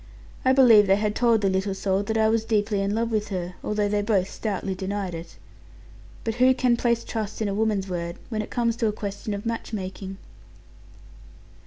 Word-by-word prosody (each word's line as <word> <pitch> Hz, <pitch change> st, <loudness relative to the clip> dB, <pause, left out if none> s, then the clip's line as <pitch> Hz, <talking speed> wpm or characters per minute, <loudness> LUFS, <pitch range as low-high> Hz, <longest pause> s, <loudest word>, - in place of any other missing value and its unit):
I 260 Hz, -, +4 dB
believe 235 Hz, -6 st, +7 dB
they 190 Hz, -, +5 dB
had 210 Hz, 0 st, 0 dB
told 230 Hz, -1 st, +3 dB
the 200 Hz, -, +2 dB
little 190 Hz, +1 st, -1 dB
soul 195 Hz, 0 st, 0 dB
that 220 Hz, +2 st, -2 dB
I 220 Hz, 0 st, +4 dB
was 220 Hz, 0 st, +2 dB
deeply 210 Hz, -2 st, 0 dB
in 200 Hz, +1 st, 0 dB
love 230 Hz, +1 st, 0 dB
with 215 Hz, -1 st, 0 dB
her; 180 Hz, -3 st, -4 dB
although 210 Hz, -1 st, 0 dB
they 205 Hz, 0 st, +1 dB
both 200 Hz, -3 st, +1 dB
stoutly 200 Hz, -3 st, -3 dB
denied 190 Hz, 0 st, -3 dB
it. 165 Hz, 0 st, -8 dB, 0.9 s
But 225 Hz, -, -1 dB
who 260 Hz, 0 st, +6 dB
can 250 Hz, -2 st, +3 dB
place 235 Hz, -1 st, +1 dB
trust 215 Hz, -2 st, -4 dB
in 220 Hz, -, 0 dB
a 200 Hz, -, -1 dB
woman's 210 Hz, -2 st, 0 dB
word, 170 Hz, -2 st, -4 dB
when 220 Hz, -3 st, -2 dB
it -, -, -7 dB
comes 235 Hz, -2 st, 0 dB
to 230 Hz, -, +1 dB
a -, -, +1 dB
question 205 Hz, +1 st, -5 dB
of 200 Hz, -, -7 dB
match 230 Hz, 0 st, -4 dB
making? 190 Hz, -1 st, -5 dB
210 Hz, 205 wpm, -25 LUFS, 195-225 Hz, 0.9 s, believe